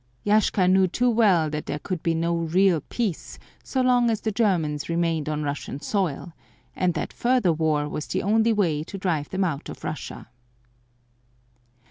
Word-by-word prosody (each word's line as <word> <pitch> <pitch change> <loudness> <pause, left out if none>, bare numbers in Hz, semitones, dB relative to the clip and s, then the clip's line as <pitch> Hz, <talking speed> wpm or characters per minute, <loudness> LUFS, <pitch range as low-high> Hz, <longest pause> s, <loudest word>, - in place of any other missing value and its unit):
Yashka 205 -3 +3
knew 190 0 +4
too 245 +7 +1
well 200 -8 +3
that 150 0 -5
there - - -2
could 180 +2 -4
be 165 -2 0
no 170 +1 0
real 170 +1 +2
peace 215 -9 -3 0.3
so 260 - -1
long 245 -2 +3
as 220 -2 -1
the 220 - -1
Germans 170 -10 0
remained 165 -2 0
on 150 0 -2
Russian 145 -1 -4
soil; 175 -3 -2 0.4
and 180 -2 0
that - - -3
further 240 -8 +2
war 155 -2 0
was 150 0 -5
the - - -2
only 220 +3 +3
way 170 -9 +1
to 195 - -8
drive 165 -6 -1
them 190 +1 -1
out 160 -6 -3
of - - -10
Russia. - - -6
175 Hz, 170 wpm, -24 LUFS, 155-210 Hz, 0.4 s, knew